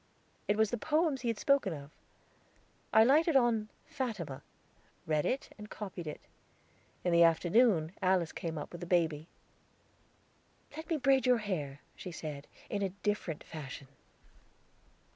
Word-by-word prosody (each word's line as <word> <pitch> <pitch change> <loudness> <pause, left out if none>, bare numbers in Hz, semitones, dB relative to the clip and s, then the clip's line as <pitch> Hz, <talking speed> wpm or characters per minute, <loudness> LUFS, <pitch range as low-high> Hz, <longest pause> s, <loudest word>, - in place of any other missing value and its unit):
It 205 - +2
was 220 -1 +3
the 240 - -2
poems 305 0 +1
he 245 - -3
had 230 -2 0
spoken 275 - +2
of. 145 -1 -9 1.0
I 220 - +7
lighted 305 +6 +4
on 230 -4 +3 0.2
"Fatima," 210 - -4 0.6
read 155 -1 +1
it 265 - -2
and 210 0 -9
copied 190 -5 -7
it. 150 - -6 0.8
In 180 - +1
the 170 - +6
afternoon 170 +1 +4
Alice 185 -3 +2
came 165 -2 -4
up 145 - -6
with 175 - -9
the 175 - -5
baby. 165 -3 +1 1.5
"Let 315 +1 -8
me 325 - +1
braid 270 -2 +3
your 250 -1 +5
hair," 155 -10 -4
she 180 - -7
said, 150 -3 -7 0.2
"in 205 - -2
a 195 - +1
different 205 -7 -1
fashion." 140 -3 -8
195 Hz, 145 wpm, -32 LUFS, 160-245 Hz, 1.5 s, I